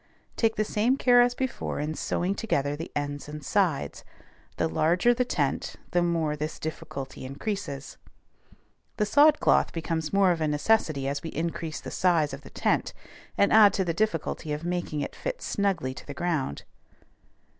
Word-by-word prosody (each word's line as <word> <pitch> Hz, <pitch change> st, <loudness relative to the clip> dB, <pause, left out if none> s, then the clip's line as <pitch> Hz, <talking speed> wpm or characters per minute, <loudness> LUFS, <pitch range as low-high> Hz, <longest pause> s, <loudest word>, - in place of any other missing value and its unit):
Take 225 Hz, -1 st, +1 dB
the 215 Hz, -, 0 dB
same 230 Hz, +6 st, +1 dB
care 245 Hz, -2 st, +6 dB
as 245 Hz, 0 st, +3 dB
before 260 Hz, -, -3 dB
in 150 Hz, +2 st, -2 dB
sewing 180 Hz, +4 st, -1 dB
together 145 Hz, -10 st, -1 dB
the 165 Hz, +3 st, -7 dB
ends 145 Hz, 0 st, -3 dB
and 150 Hz, -1 st, -8 dB
sides; 180 Hz, -9 st, 0 dB, 0.5 s
the -, -, +1 dB
larger 170 Hz, -, +3 dB
the 250 Hz, +1 st, +1 dB
tent, 145 Hz, -, -1 dB, 0.2 s
the 175 Hz, -, +2 dB
more 165 Hz, -3 st, 0 dB
this 155 Hz, +1 st, -4 dB
difficulty 135 Hz, -4 st, -6 dB
increases. 145 Hz, 0 st, -5 dB, 1.0 s
The 210 Hz, -, +2 dB
sod 295 Hz, +8 st, +5 dB
cloth -, -, +3 dB
becomes 160 Hz, -1 st, -3 dB
more 195 Hz, -2 st, +4 dB
of 165 Hz, -2 st, -1 dB
a 155 Hz, -, +2 dB
necessity 150 Hz, -2 st, +1 dB
as 140 Hz, +1 st, -2 dB
we 165 Hz, -, -5 dB
increase 160 Hz, 0 st, -3 dB
the -, -, -7 dB
size 165 Hz, -6 st, +2 dB
of 135 Hz, -, -7 dB
the -, -, -13 dB
tent, -, -, 0 dB, 0.4 s
and 200 Hz, -, +4 dB
add 215 Hz, -2 st, +8 dB
to 190 Hz, -, 0 dB
the 170 Hz, -, 0 dB
difficulty 165 Hz, -5 st, -1 dB
of 150 Hz, +2 st, -4 dB
making 175 Hz, -4 st, -2 dB
it -, -, -5 dB
fit -, -, -4 dB
snugly 190 Hz, -, -1 dB
to -, -, -11 dB
the 145 Hz, -, -7 dB
ground. 155 Hz, -, -2 dB
165 Hz, 175 wpm, -27 LUFS, 150-205 Hz, 1.0 s, add